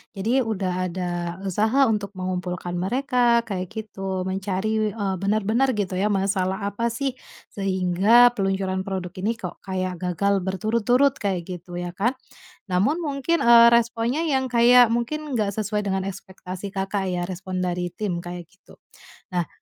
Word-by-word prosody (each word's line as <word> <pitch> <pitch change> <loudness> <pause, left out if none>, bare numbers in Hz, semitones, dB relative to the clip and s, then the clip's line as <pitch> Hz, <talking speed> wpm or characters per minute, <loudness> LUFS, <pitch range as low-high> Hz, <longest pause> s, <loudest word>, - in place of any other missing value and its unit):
jadi 225 +7 +1
udah 195 -4 -1
ada 180 0 -3 0.3
usaha 215 +8 +2
untuk 205 -2 -2
mengumpulkan 180 -1 -3
mereka 240 +3 +2
kayak 185 -3 -3
gitu, 195 -4 -4
mencari, 195 +3 -1
eee, 200 -3 -1
benar-benar 215 +6 +1
gitu 195 -3 -2
ya 205 - +2
masalah 195 0 0
apa 215 +3 -1
sih, 270 +4 -1 0.4
sehingga 195 +5 +4
peluncuran 190 -2 -1
produk 185 -2 -3
ini 215 +5 0
kok 180 -6 -7
kayak 185 -2 -3
gagal 195 +3 +1
berturut-turut 230 +8 +2
kayak 190 -4 -1
gitu 180 -1 -8
ya 175 0 -4
kan. 220 +9 0 0.6
Namun 205 - +2
mungkin, 295 +3 0
eee, 235 0 +8
responnya 235 +4 +1
yang 265 -5 +1
kayak 245 +1 +7
mungkin 280 +4 -2
nggak 210 -3 0
sesuai 210 -1 -1
dengan 190 -1 0
ekspektasi 190 0 -7
Kakak 195 0 -1
ya, 175 -1 -1
respon 185 0 -5
dari 180 0 -2
tim 180 -1 -3
kayak 175 -1 -7
gitu. 195 - -20 0.5
Nah 175 -3 -1
195 Hz, 145 wpm, -24 LUFS, 185-230 Hz, 0.6 s, eee